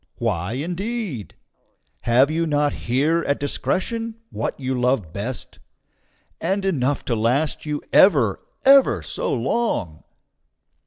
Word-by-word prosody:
Why 100 -4 -1
indeed? 175 - -4 0.6
Have 125 +5 +3
you 165 +1 0
not 145 -1 +1
here 145 +8 +1
at 140 - +1
discretion 205 - -2 0.2
what - - -3
you 130 -1 -2
love 125 -9 0
best, 120 +6 -6 0.8
and 195 +1 -1
enough 145 -7 0
to 120 - 0
last 130 +8 0
you 150 -1 -3
ever, 135 - +5 0.3
ever 265 - +6
so - - -3
long? 115 - -1
140 Hz, 115 wpm, -22 LUFS, 120-175 Hz, 0.8 s, ever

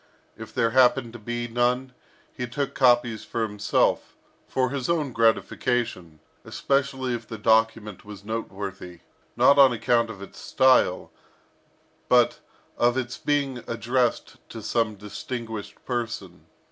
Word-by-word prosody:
If - - -10
there 115 0 +1
happened 125 -1 +3
to 120 - -9
be 120 +2 -4
none, 125 +2 0 0.4
he 125 - -4
took 140 +4 -3
copies 120 -3 +3
for 115 - -3
himself, 105 -2 0 0.3
for 130 -1 0
his 135 -1 -3
own 155 -5 0
gratification, 115 -6 0 0.2
especially 135 -2 -1
if 115 -1 -5
the 115 - -7
document 110 -2 +1
was 105 -1 -11
noteworthy, 95 -5 -6 0.4
not 140 0 +5
on 135 -2 +8
account 115 0 +1
of 110 - -8
its 100 - -11
style, 130 -1 +2 1.0
but 125 -1 +4 0.4
of 120 +1 +3
its 125 -1 -3
being 140 -3 0
addressed 120 +1 -1
to 115 - -8
some 110 0 0
distinguished 110 +1 -7
person. 120 -3 -5
120 Hz, 130 wpm, -25 LUFS, 110-130 Hz, 1.0 s, on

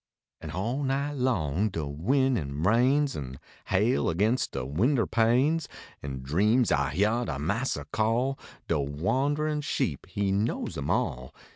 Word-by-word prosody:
An - - -7
all 115 +9 -2
night 140 +1 -1
long 105 - 0
de 80 -5 -3
win 125 - +1
an 70 -4 -3
rains, 130 - +3
An 65 -2 -6 0.3
hail 105 +7 +2
against 105 +9 +1
de - - -3
winder 115 - +1
panes, 130 +7 +2 0.3
In 65 -2 -6
dreams 105 - +2
I 70 0 +2
hyar 110 +6 +2
de 70 - -3
massa 85 - -2
call 120 +5 0 0.3
De 85 - +1
wanderin 135 - 0
sheep, 80 - -2
he 100 +1 -1
knows 100 +4 -1
em - - -4
all. 65 0 -1
110 Hz, 145 wpm, -28 LUFS, -, 0.3 s, rains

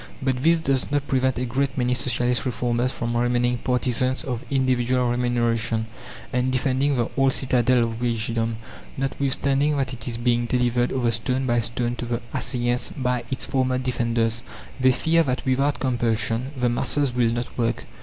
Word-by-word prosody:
But 130 -1 0
this 165 +3 +4
does 135 -5 0
not 145 0 0
prevent 130 -1 +1
a 125 - -1
great 135 +2 -1
many 125 -1 +1
Socialist 125 -1 0
reformers 120 +1 0
from 120 -2 -3
remaining 120 0 +1
partisans 130 +1 0
of 125 -5 -4
individual 125 -2 +1
remuneration, 115 -2 0 0.5
and 125 +1 +1
defending 135 +2 +1
the 120 -2 -1
old 135 -1 +3
citadel 125 -2 +2
of 115 0 -3
wagedom, 115 -1 0 0.4
notwithstanding 140 +2 0
that 135 -2 -1
it 115 -3 -7
is 115 -1 -1
being 120 0 +1
delivered 125 0 +1
over 120 -3 +1
stone 125 +4 0
by 120 -1 +2
stone 120 +2 -2
to - - -4
the 120 0 -2
assailants 120 -1 -1
by 125 -2 0
its 130 - -2
former 130 -1 0
defenders. 115 -3 0 0.4
They 130 0 +5
fear 165 +6 +2
that 130 -4 -1
without 135 +2 +1
compulsion 120 -1 0
the 125 - +2
masses 130 +3 0
will 120 -2 +2
not 120 +1 -3
work. 115 -1 -1
125 Hz, 165 wpm, -24 LUFS, 120-130 Hz, 0.5 s, They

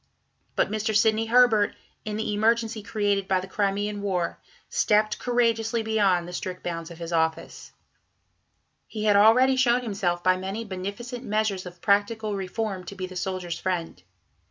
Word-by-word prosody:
But - - +1
Mr. 215 0 -1
Sidney 220 +1 +3
Herbert, 230 -3 +4 0.3
in 210 -1 -3
the 220 -1 -2
emergency 225 +1 +1
created 205 -2 -1
by 190 -1 +2
the 185 - -6
Crimean 205 +1 -1
War, 185 -4 -2 0.3
stepped 215 0 +2
courageously 230 -2 +1
beyond 200 -6 +2
the 180 - -8
strict 185 -1 -5
bounds 165 -1 -4
of 170 - -10
his 170 0 -6
office. 160 -1 -2 1.2
He 215 -2 -5
had 210 -1 +4
already 240 +6 +6
shown 250 -1 +3
himself 190 -6 -2
by 185 0 +4
many 195 +5 -4
beneficent 205 +6 -6
measures 210 -4 -1
of 175 0 -12
practical 210 +1 +1
reform 195 0 -3
to 200 - -8
be 185 -1 -4
the 185 0 -10
Soldiers' 180 -2 -3
Friend. 180 -3 -3
205 Hz, 155 wpm, -25 LUFS, 185-220 Hz, 1.2 s, already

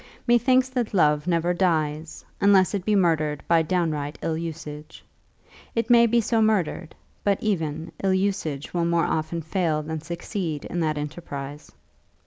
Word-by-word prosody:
Methinks 255 +2 +4
that 245 -5 -2
love 150 -2 +3
never 175 0 +1
dies, 155 -3 -1 0.2
unless 200 -2 +5
it 200 -3 -2
be 215 - +2
murdered 155 -6 +1
by 165 -1 +4
downright 155 -3 -1
ill 160 - 0
usage. 155 -2 -7 0.7
It 230 +1 0
may 235 -1 +7
be 235 +1 +3
so 225 0 +1
murdered, 205 -7 0 0.3
but 200 -1 +2
even 160 -6 -2
ill 190 -1 +3
usage 185 -7 -2
will 170 -1 +1
more 170 0 +2
often 160 +1 -2
fail 160 -2 0
than 160 0 -5
succeed 170 -1 -4
in 175 - -4
that 155 -2 0
enterprise. 145 -1 -6
170 Hz, 150 wpm, -24 LUFS, 155-200 Hz, 0.7 s, may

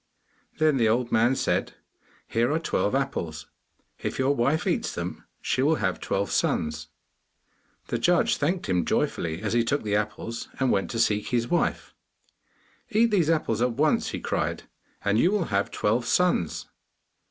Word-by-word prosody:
Then 155 -3 +3
the 115 -3 +3
old 120 +2 0
man 120 +4 +3
said, - - 0 0.5
'Here 120 +3 +1
are 155 - +2
twelve 115 - 0
apples. 85 - -2 0.5
If - - -4
your 130 +2 +2
wife 140 +6 +1
eats - - -1
them, - - -5 0.2
she 130 - 0
will 155 +4 +3
have 95 -9 -1
twelve 100 +1 -2
sons.' 75 0 0 1.0
The - - -1
judge - - +3
thanked 175 +5 -1
him 90 -2 +1
joyfully 80 +3 -1
as 110 - -1
he 120 0 +3
took 140 +4 -1
the 105 -1 0
apples, 110 +2 -3
and 130 -2 +2
went 95 - 0
to 115 - -3
seek 105 -2 +1
his 120 -2 0
wife. 175 - 0 1.0
'Eat 230 0 +3
these 175 -7 +2
apples 135 -9 +1
at 125 -1 +2
once,' 150 +5 +2
he - - -4
cried, - - -2 0.4
'and 100 +2 +3
you 175 - +4
will 205 -5 +1
have 100 +1 +1
twelve 115 +3 0
sons. 180 - +1
120 Hz, 165 wpm, -26 LUFS, 105-150 Hz, 1.0 s, you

